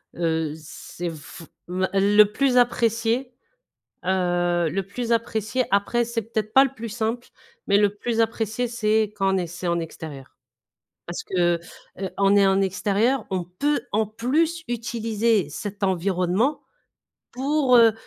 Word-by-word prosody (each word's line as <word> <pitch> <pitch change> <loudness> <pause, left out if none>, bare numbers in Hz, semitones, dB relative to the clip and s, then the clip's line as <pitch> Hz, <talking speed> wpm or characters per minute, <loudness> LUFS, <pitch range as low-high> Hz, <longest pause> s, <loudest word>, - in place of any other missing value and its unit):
Heu, 160 -2 -1
c'est 165 +2 -7
f 160 +1 -10 0.3
va 185 +1 -1
le 200 +2 +6
plus 250 +5 +1
apprécié, 235 +1 +1 0.7
heu, 175 -2 +1
le 195 +6 -1
plus 235 +4 -4
apprécié 230 +2 -1
après 200 +4 +2
c'est 235 0 -2
peut-être 215 -1 -4
pas 270 +1 +7
le 270 - -5
plus 230 -3 -7
simple, 225 +2 -3 0.4
mais 200 - +4
le 205 -1 +3
plus 230 +2 -2
apprécié 225 +1 0
c'est 220 -2 +1
quand 195 -1 +1
on - - +2
est 180 -2 -2
c'est 175 +2 -6
en 170 0 +1
extérieur. 155 -4 -8 0.7
Parce 175 - -5
que, 175 -2 +1 0.4
heu, 190 -1 -3
en 195 0 +3
é 200 -1 +5
en 195 0 +3
extérieur 205 +6 +1
on 185 -2 -1
peut 285 +13 -1
en 215 +1 +2
plus 310 +10 0
utiliser 230 - 0
cet 205 +6 -5
environnement 190 - 0 0.7
pour, 270 0 +2
heu, 230 -2 +6
210 Hz, 150 wpm, -24 LUFS, 185-235 Hz, 0.7 s, pas